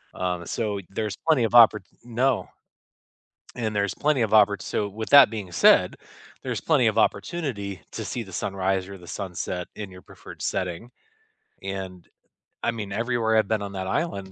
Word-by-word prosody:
Um, 90 -1 -2
so 105 -3 -2
there's 105 0 -3
plenty 155 -7 +4
of 115 - -3
opport 110 -4 +7 0.2
No. 120 +1 0 1.1
And 110 -3 -3
there's 100 -2 0
plenty 150 -3 +1
of 110 - 0
opport 105 -2 +4
so, 105 - -2
with 110 +2 -6
that 140 -4 +9
being 105 -5 -6
said, 85 - +4 0.4
there's - - -4
plenty 145 -7 +3
of 110 0 0
opportunity 110 - -1
to - - -5
see 120 - -4
the 95 -3 -13
sunrise 95 0 -1
or 100 0 -9
the 90 -1 -15
sunset 90 -2 -5
in 100 -3 -7
your 90 0 -12
preferred - - -13
setting, 90 +5 -3 0.7
and, 95 -2 -6 0.6
I - - +2
mean, 105 -4 -6
everywhere 115 +1 0
I've 110 - +3
been 110 0 0
on 100 -1 -6
that 95 -1 -4
island, 100 - -2
105 Hz, 170 wpm, -25 LUFS, 95-115 Hz, 1.1 s, that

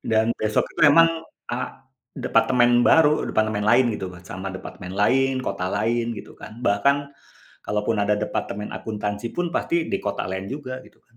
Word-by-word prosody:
Dan 110 0 +1
besoknya 110 0 0
memang 165 +3 +7 0.4
a 120 - -1 0.6
departemen 120 -2 +3
baru, 155 -1 +5
departemen 110 -1 0
lain 120 +4 +5
gitu 95 - -5
mat 90 0 -13
sama 95 +1 -5
departemen 90 -1 -8
lain, 135 +6 +3
kota 90 -2 -2
lain 115 +4 0
gitu - - -9
kan. 110 - -10
Bahkan 120 +8 +3 0.7
kalaupun 105 +1 -1
ada 105 +1 +2
departemen 105 -1 -3
akuntansi 105 +1 -4
pun, 175 -1 -1
pasti 170 -1 0
di - - 0
kota - - -3
lain 95 0 -4
juga 130 -3 -6
gitu - - -21
kan, 115 - -31
110 Hz, 160 wpm, -23 LUFS, 105-130 Hz, 0.7 s, memang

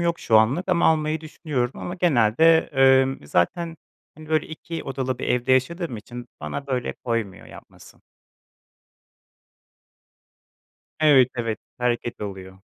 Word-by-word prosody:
yok 170 0 0
şu 110 -1 +4
anlık 135 - +1
ama 175 -2 +3
almayı 155 0 +1
düşünüyorum 150 -5 -4
ama 175 - -5
genelde, 160 - +3 0.3
ımm, 130 - -4
zaten, 165 - 0 0.4
hani, 155 0 -13
böyle, 155 -1 +1
2 165 +1 -7
odalı 130 -2 -3
bir - - -4
evde 125 +1 +1
yaşadığım 155 +1 0
için 120 +3 -10
bana 75 - -5
böyle 125 -3 -2
koymuyor 115 -5 -4
yapması. - - -16 3.0
Evet, 140 -5 +6
evet. 115 -3 -3 0.2
Hareket 120 -1 -2
oluyor. 95 -2 -8
130 Hz, 120 wpm, -23 LUFS, 115-160 Hz, 3.0 s, Evet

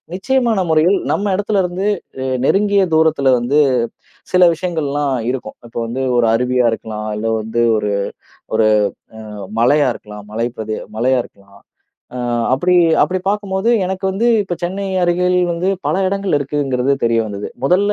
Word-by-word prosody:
நிச்சயமான 235 +1 +1
முறையில் 160 +5 +3
நம்ம 205 - -1
இடத்துல 205 0 0
இருந்து 180 +3 -2 0.3
அ - - -2 0.2
நெருங்கிய 200 +3 +3
தூரத்தில 155 -4 +3
வந்து 130 +5 +1 0.7
சில 180 0 +6
விஷயங்கள்லாம் 145 -5 -2 0.2
இருக்கும். 130 0 -5
இப்போ 115 - -8
வந்து 120 +3 -4 0.2
ஒரு 120 -1 +3
அருவியா 125 +1 +1
இருக்கலாம். 110 -1 -5
இல்ல 105 +2 -3
வந்து 110 +2 -2 0.2
ஒரு 105 -1 -1 0.6
ஒரு 110 - +3 0.7
அ - - -8 0.2
மலையா 145 +5 +4
இருக்கலாம், 105 -1 -10
மலை 115 +2 -1
பிரதி 110 0 -4 0.2
மலையா 130 +3 +2
இருக்கலாம். 100 0 -19 0.6
அ - - -4 0.4
அப்படி 180 +7 +1 0.3
அப்படி 185 0 0
பார்க்கும்போது 200 0 -1 0.2
எனக்கு 190 +1 -4
வந்து 210 +5 0 0.2
இப்ப 180 -3 -4
சென்னை 195 +3 -3 0.2
அருகில 180 +1 +2
வந்து 175 +3 0 0.2
பல - - +1
இடங்கள் 195 -4 0
இருக்குங்கிறது 140 -2 0
தெரிய 115 0 +2
வந்தது. 100 -1 -6
முதல்ல 195 +7 +3
150 Hz, 145 wpm, -17 LUFS, 120-190 Hz, 0.7 s, சில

